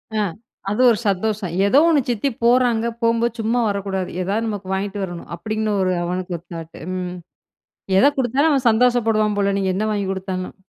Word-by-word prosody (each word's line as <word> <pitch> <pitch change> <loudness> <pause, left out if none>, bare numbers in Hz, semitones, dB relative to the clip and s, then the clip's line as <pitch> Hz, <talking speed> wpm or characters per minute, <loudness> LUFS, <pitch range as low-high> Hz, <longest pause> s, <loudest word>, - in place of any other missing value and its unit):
ஆ - - +1 0.5
அது 210 - 0
ஒரு 230 - +3
சந்தோஷம். 200 -1 -1
"ஏதோ 230 +8 +5
1 320 -3 +4
சித்தி 240 +4 0
போறாங்க. 240 -1 +3 0.2
போகும்போது, 230 0 +1
சும்மா 230 +3 +1
வரக்கூடாது 195 -2 -2
எதா 195 +3 -1
நமக்கு 205 -3 -4
வாங்கிட்டு 200 +1 -3
வரணும்" 175 -2 -7
அப்படின்னு 215 +4 -3
ஒரு 185 - +1
அவனுக்கு 180 0 -3
ஒரு 170 - -19
தாட். 165 -1 -8 0.2
ம் 180 -1 -4 0.8
எத 195 - +6
குடுத்தாலும் 265 +5 +2
அவன் 265 -4 +2
சந்தோஷப்படுவான் 225 -2 +2
போல, 200 0 +2
நீங்க 195 -1 0
என்ன 205 - -1
வாங்கிக் 200 -2 -1
குடுத்தாலும். 185 -1 -4
210 Hz, 170 wpm, -21 LUFS, 190-230 Hz, 0.8 s, எத